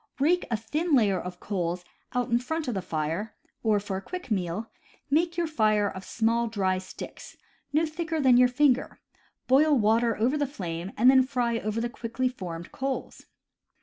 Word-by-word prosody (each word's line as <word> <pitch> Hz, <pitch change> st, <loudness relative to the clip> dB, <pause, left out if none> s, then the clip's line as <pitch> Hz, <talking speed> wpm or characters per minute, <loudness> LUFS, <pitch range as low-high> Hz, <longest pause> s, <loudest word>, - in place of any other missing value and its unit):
„. -, -, -31 dB
Rake 345 Hz, +6 st, +2 dB
a 230 Hz, -, 0 dB
thin 300 Hz, +9 st, 0 dB
layer 205 Hz, -7 st, +3 dB
of 180 Hz, 0 st, -7 dB
coals 175 Hz, -3 st, -3 dB, 0.3 s
out 245 Hz, -1 st, -1 dB
in 235 Hz, -, +4 dB
front 320 Hz, +5 st, -3 dB
of 245 Hz, -, -1 dB
the 190 Hz, -, -2 dB
fire; 165 Hz, +5 st, -3 dB, 0.3 s
or, 215 Hz, -2 st, +2 dB
for 200 Hz, -1 st, -4 dB
a -, -, -5 dB
quick 360 Hz, -, -7 dB
meal, 190 Hz, +2 st, -1 dB, 0.4 s
make 335 Hz, +3 st, +2 dB
your 345 Hz, -, +1 dB
fire 215 Hz, -9 st, +2 dB
of 190 Hz, -1 st, -6 dB
small 230 Hz, +2 st, +1 dB
dry 190 Hz, -4 st, 0 dB
sticks, 185 Hz, -, -10 dB, 0.3 s
no 310 Hz, +3 st, +3 dB
thicker 320 Hz, 0 st, -3 dB
than 260 Hz, -4 st, +5 dB
your 250 Hz, +1 st, +7 dB
fin 255 Hz, +2 st, +4 dB
ger, 255 Hz, -, -8 dB, 0.5 s
boil 285 Hz, +3 st, +5 dB
water 230 Hz, +1 st, +2 dB
over 255 Hz, +7 st, +1 dB
the 290 Hz, -, +1 dB
flame, 180 Hz, -, -5 dB
and 250 Hz, +4 st, +7 dB
then 265 Hz, -1 st, +6 dB
fry 245 Hz, -3 st, 0 dB
over 215 Hz, +1 st, -2 dB
the 235 Hz, -, 0 dB
quickly 240 Hz, +2 st, -2 dB
formed 175 Hz, -9 st, -6 dB
coals. 270 Hz, 0 st, -4 dB
235 Hz, 190 wpm, -27 LUFS, 200-270 Hz, 0.5 s, your